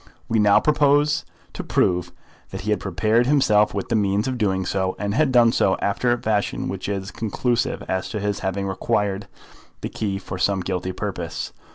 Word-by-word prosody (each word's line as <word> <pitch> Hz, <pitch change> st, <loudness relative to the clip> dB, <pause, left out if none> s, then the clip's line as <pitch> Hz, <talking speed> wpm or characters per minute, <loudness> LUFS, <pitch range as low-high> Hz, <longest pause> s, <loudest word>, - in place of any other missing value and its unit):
We 115 Hz, -, +1 dB
now 105 Hz, -1 st, +5 dB
propose 145 Hz, 0 st, +3 dB, 0.3 s
to -, -, -5 dB
prove 90 Hz, -1 st, +1 dB, 0.4 s
that -, -, -6 dB
he 105 Hz, -, -2 dB
had 105 Hz, -, +1 dB
prepared 110 Hz, +6 st, +1 dB
himself 105 Hz, -7 st, +4 dB
with 100 Hz, -, -3 dB
the 115 Hz, -, +1 dB
means 100 Hz, 0 st, +1 dB
of 130 Hz, -2 st, -2 dB
doing 95 Hz, -3 st, 0 dB
so, 95 Hz, 0 st, -1 dB
and 100 Hz, -1 st, -2 dB
had 145 Hz, +3 st, +2 dB
done 120 Hz, -2 st, +5 dB
so 95 Hz, -4 st, +2 dB
after 120 Hz, +5 st, 0 dB
a 120 Hz, -, +1 dB
fashion 105 Hz, -3 st, -1 dB
which -, -, -4 dB
is 100 Hz, -1 st, -3 dB
conclusive 115 Hz, +2 st, -1 dB
as 95 Hz, 0 st, -2 dB
to 105 Hz, -, -3 dB
his 105 Hz, 0 st, -2 dB
having 95 Hz, +1 st, -2 dB
required 100 Hz, 0 st, -1 dB, 0.5 s
the -, -, -3 dB
key 100 Hz, -3 st, -3 dB
for 95 Hz, -1 st, -7 dB
some 95 Hz, 0 st, +1 dB
guilty 95 Hz, 0 st, -3 dB
purpose. 90 Hz, -, -5 dB
105 Hz, 190 wpm, -23 LUFS, 95-115 Hz, 0.5 s, now